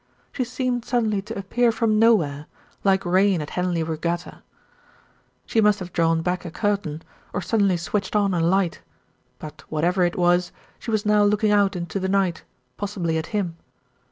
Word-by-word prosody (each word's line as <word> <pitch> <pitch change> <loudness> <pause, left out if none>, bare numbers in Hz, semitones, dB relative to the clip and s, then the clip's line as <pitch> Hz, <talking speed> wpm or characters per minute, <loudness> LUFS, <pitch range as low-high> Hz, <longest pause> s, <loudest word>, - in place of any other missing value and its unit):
She 255 - -2
seemed 250 -1 -2
suddenly 220 -5 0
to 215 +2 -7
appear 230 +5 +1
from 220 -2 +1
nowhere, 160 -11 +3 0.4
like 195 -1 +2
rain 185 +1 +3
at 150 - -6
Henley 180 -2 -1
Regatta. 170 +2 -3 1.0
She 225 - +1
must 210 -1 +4
have 180 -3 -8
drawn 165 -1 +2
back 180 +1 -1
a 175 - -6
curtain, 195 -5 -2 0.3
or 200 - -2
suddenly 200 -5 +2
switched 190 +5 -3
on 200 -2 +2
a 175 - 0
light; 175 +1 +1 0.6
but 155 - -10
whatever 175 +4 +1
it 175 0 +1
was, 175 0 +2 0.3
she - - -8
was 215 -2 0
now 210 0 +4
looking 210 +1 +2
out 200 -2 +3
into 175 +2 -3
the 190 0 -2
night, 190 -4 0 0.3
possibly 180 -6 -2
at 160 - -5
him. 185 -6 -2
190 Hz, 170 wpm, -23 LUFS, 170-210 Hz, 1.0 s, must